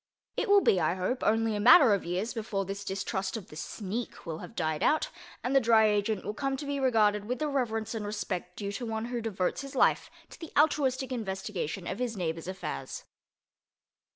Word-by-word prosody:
It - - -1
will 405 0 +7
be, 190 - +4
I 160 +3 +1
hope, 190 +8 -2
only 225 0 +2
a - - -1
matter 245 +2 +8
of 200 - 0
years 185 +7 -2
before 210 -4 -2
this 200 +1 -5
distrust 195 +1 -2
of 210 - -10
the - - -11
"sneak" 210 +8 -5
will 165 -2 -4
have 230 - -10
died 160 -4 -1
out, 310 - +2 0.3
and 260 +2 0
the - - +8
Dry 225 -3 +5
Agent 210 -1 +1
will 210 - -2
come 270 +3 -2
to 290 - -6
be 285 0 -2
regarded 210 -5 +3
with 250 +3 -2
the 305 - -1
reverence 235 -6 -1
and 220 -2 -3
respect 195 -4 -4
due 200 -1 -4
to 240 +4 -4
one 220 0 -2
who 240 - -1
devotes 195 -2 -1
his 275 0 -8
life - - +3 0.2
to - - -12
the 325 - -8
altruistic 270 -4 +2
investigation 190 -6 -3
of 195 - -4
his 240 -4 -2
neighbor's 165 -2 -3
affairs. 185 - -5
215 Hz, 210 wpm, -29 LUFS, 190-250 Hz, 0.3 s, matter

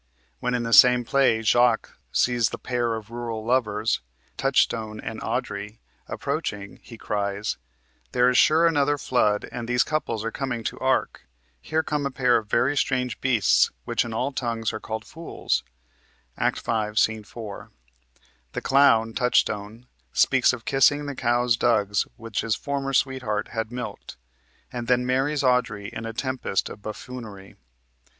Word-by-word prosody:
When 125 0 -1
in 120 - -1
the 115 0 -2
same 125 +4 +8
play 125 -4 +2
Jaques 120 +1 +3 0.2
sees 120 -3 +2
the - - -6
pair 120 -2 -1
of 110 0 -8
rural 115 -2 -5
lovers, 110 -3 +1 0.3
Touchstone 115 -5 +1
and - - -6
Audrey, 105 +2 -4 0.3
approaching, 100 -1 -4
he 115 - -12
cries: 100 -1 -2 0.5
"There 125 0 +3
is, 125 - +2
sure, 160 +6 +5
another 145 -3 +2
flood, 115 -6 +1
and 120 -1 -5
these 125 +1 +3
couples 115 -8 -2
are 115 - -2
coming 125 -3 -3
to - - -3
the - - -14
ark! 130 - 0 0.3
Here 160 0 -1
come 150 -2 -1
a - - -3
pair 125 -2 +3
of 110 -1 -5
very 130 +7 +2
strange 125 -4 -1
beasts, 120 -7 +3 0.2
which - - +1
in 115 - -6
all 125 +5 -1
tongues 115 -4 -2
are 110 - -4
called 110 0 -5
fools" 165 +1 -3 0.7
(Act - - 0
5, 110 -2 -2
Sc. 110 -1 +2
4). 105 -1 -9 0.8
The - - -3
clown, 115 -5 +4
Touchstone, 110 -2 0 0.3
speaks 130 -1 +4
of 120 -2 -7
kissing 145 +2 +3
the 145 - -4
cow's 120 -1 +2
dugs 105 -4 +1
which 115 -1 -3
his 110 -2 0
former 140 +1 -3
sweetheart 130 -6 0
had 115 -1 -4
milked, 125 0 -7 0.6
and 120 -1 -4
then 125 0 +2
marries 135 +3 0
Audrey 125 -6 +1
in 115 - -5
a - - -4
tempest 130 -4 -2
of 100 - -10
buffoonery. 110 -2 -8
120 Hz, 155 wpm, -25 LUFS, 110-130 Hz, 0.8 s, same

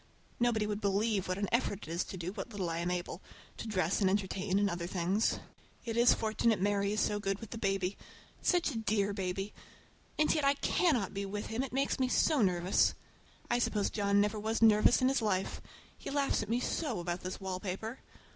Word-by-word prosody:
Nobody 235 -3 +2
would 210 0 -3
believe 200 0 +1
what 185 0 -1
an 200 0 -1
effort 230 -4 0
it - - -6
is 170 +2 0
to 190 - -7
do 175 +1 -4
what 205 +3 -6
little 195 -6 -3
I 165 - -2
am 170 +1 -1
able—to 180 +4 -6
dress 185 -2 0
and 190 - +4
entertain, 195 0 0
and 205 0 +3
order 170 -2 -3
things. 185 +4 0 0.5
It 230 -1 -3
is 240 +1 +6
fortunate 220 -1 +1
Mary 200 +1 +1
is 215 - 0
so 210 0 +1
good 195 -1 -1
with 225 -1 -10
the 230 - -5
baby. 195 -2 0 0.4
Such 350 -4 +2
a 230 - -3
dear 205 -2 0
baby! 195 +1 -3 0.6
And 305 - +3
yet 305 - 0
I 280 0 +4
cannot 280 - +1
be 200 - -3
with 205 +1 -4
him, 235 - 0
it 270 - -4
makes 275 +1 0
me 260 - +2
so 280 +2 +3
nervous. 180 -1 +3 0.5
I 240 - +1
suppose 210 -4 0
John 200 -1 +2
never 210 +1 +1
was 220 +2 -1
nervous 220 +3 +5
in - - +5
his 270 -2 +2
life. 195 -3 -1 0.3
He - - -8
laughs 280 -3 +1
at 210 - -6
me 235 +2 +1
so 255 - -2
about 175 0 -3
this 185 0 -5
wallpaper! 190 +5 -4
205 Hz, 210 wpm, -32 LUFS, 190-230 Hz, 0.6 s, is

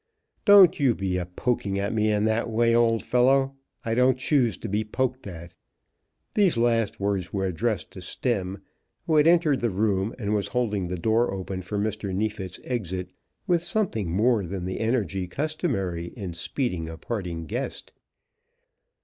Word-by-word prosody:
Don't 200 -6 +8
you 130 -5 +3
be 90 -2 -1
poking 105 -5 -1
at 100 +2 -1
me 110 -1 +2
in 105 0 +2
that 110 +2 0
way, 115 +1 +2
old 115 -1 +3
fellow. 135 +2 +3 0.3
I 115 - 0
don't 125 +2 +3
choose 130 -4 +1
to - - -6
be 105 +2 0
poked 130 +2 -2
at." 85 -1 -9 0.8
These 195 - +3
last 115 -2 +1
words 100 -3 -1
were 95 -1 -1
addressed 105 +4 -2
to 95 - -10
Stemm, 95 -1 -2 0.4
who 155 - +2
had 150 +1 +5
entered 165 -5 +4
the 120 - 0
room, 100 +1 0
and 105 -4 -2
was 105 -2 0
holding 105 -7 -1
the 90 +1 -3
door 110 +6 +2
open 95 -1 -4
for 100 +3 -4
Mr. 105 -2 -2
Neefit's 105 -2 -3
exit 95 -7 -3 0.3
with 175 -2 +2
something 175 - 0
more 110 +4 +2
than 90 0 -5
the 95 - -3
energy 110 -5 -1
customary 100 - -2
in 95 -4 -5
speeding 85 - -2
a 80 - -7
parting 90 -6 -4
guest. - - -5
110 Hz, 165 wpm, -26 LUFS, 95-125 Hz, 0.8 s, Don't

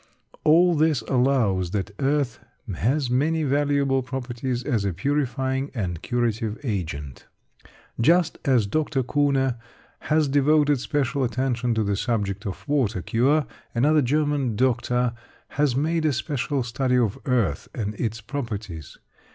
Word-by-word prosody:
All 170 +3 +5
this 155 -3 +2
shows 120 -9 +2
that 100 +1 -3
earth 140 -2 0 0.3
has 130 - 0
many 155 +5 +1
valuable 140 -1 +1
properties 125 -1 -4
as 115 -5 0
a 100 -2 -1
purifying 135 - -1
and 90 -8 -3
curative 115 -2 -1
agent. 80 - -4 0.7
Just 165 +7 +3
as 130 -7 +3
Dr. 145 +3 0
Kuhne 135 -2 +1 0.4
has 155 -1 +1
devoted 145 0 +3
special 140 0 -1
attention 125 -1 0
to 110 - +1
the 100 -1 0
subject 105 -1 -2
of 95 - -7
water 120 - 0
cure, 140 +6 +2 0.3
another 150 +6 +4
German 145 -3 0
doctor 125 0 +1 0.4
has 145 -4 +1
made 160 +4 0
a 150 - +2
special 140 0 -1
study 125 +1 0
of 115 -5 +1
earth 115 - 0
and 105 -2 -2
its 115 -1 -2
properties. 105 - -6
130 Hz, 130 wpm, -24 LUFS, 115-145 Hz, 0.7 s, All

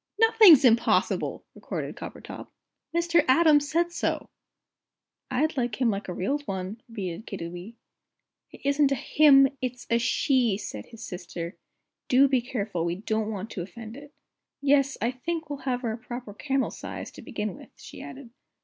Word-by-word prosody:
"Nothing's 440 - +8
impossible!" 235 -1 +2
retorted - - -5
Coppertop; - - -9 0.4
"Mr. 340 -1 +3
Atom 305 +2 +6
said 335 +4 0
so." 340 - -2 1.0
"I'd 300 +5 0
like 240 -3 -1
him 245 -3 +3
like 200 0 -4
a 180 - -4
real 275 +11 -1
one," 195 +3 -4
repeated 200 -2 -6
Kiddiwee. 175 +3 -7 0.7
"It - - -15
isn't 280 0 +3
a - - +3
'him,' 275 0 +5
it's 250 -1 -4
a 235 - +4
'she'!" 235 -2 +2
said 105 - -7
his 230 0 -10
sister. 175 -2 -6 0.5
"Do 265 +2 +5
be 260 -2 +2
careful, 210 -8 -3
we 170 0 -1
don't 215 +2 -2
want 215 +1 -5
to 180 - -4
offend 220 +5 -9
it." 290 +1 -12 0.5
"Yes, 275 -1 +2
I 235 - +2
think 315 +4 -4
we'll 285 - -4
have 250 -1 -1
her 230 - -1
a 220 - -4
proper 240 -2 -7
camel 270 +4 -1
size, - - -7
to - - -12
begin - - -4
with," - - -14
she - - -11
added. 260 -3 -10
245 Hz, 165 wpm, -27 LUFS, 210-280 Hz, 1.0 s, Nothing's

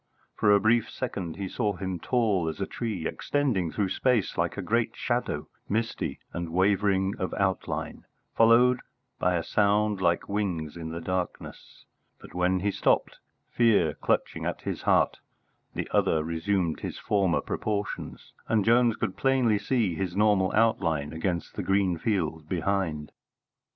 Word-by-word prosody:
For 105 - +3
a 100 - +6
brief 110 +3 +2
second 95 -10 -4
he 100 -1 -4
saw 105 0 -1
him, 95 -1 -4
tall 105 -8 +1
as 80 - -7
a 95 - 0
tree, 105 -9 -4
extending 120 - -1
through 100 -3 -1
space 120 -1 +1
like - - -1
a - - -2
great - - 0
shadow, - - -2 0.2
misty 115 +2 -2 0.2
and 85 -1 -4
wavering 95 +2 +2
of 95 - -2
outline, 95 -2 -2 0.3
followed 120 +2 +5 0.4
by 90 0 +2
a 85 - -1
sound 105 0 +1
like 85 -1 +1
wings 90 -7 -2
in 80 -2 -6
the 85 +1 -5
darkness; 90 +1 -5 0.3
but, - - -13
when 90 +1 +1
he 100 +1 +1
stopped, - - +1 0.3
fear 105 -10 +3
clutching - - -1
at - - -3
his - - -4
heart, - - +2 0.6
the - - -3
other 80 -1 +2
resumed 85 +1 -1
his - - -5
former 95 -4 +1
proportions, 105 -1 -4
and 110 -3 +2
Jones 120 0 +4
could 95 - -3
plainly 130 -6 +2
see 105 -3 0
his 90 +1 -3
normal 100 -3 +3
outline 85 -10 +1
against 85 +1 -2
the - - -4
green 95 -3 +1
field 80 -7 -2
behind. 85 -4 -1
95 Hz, 150 wpm, -27 LUFS, 85-105 Hz, 0.6 s, a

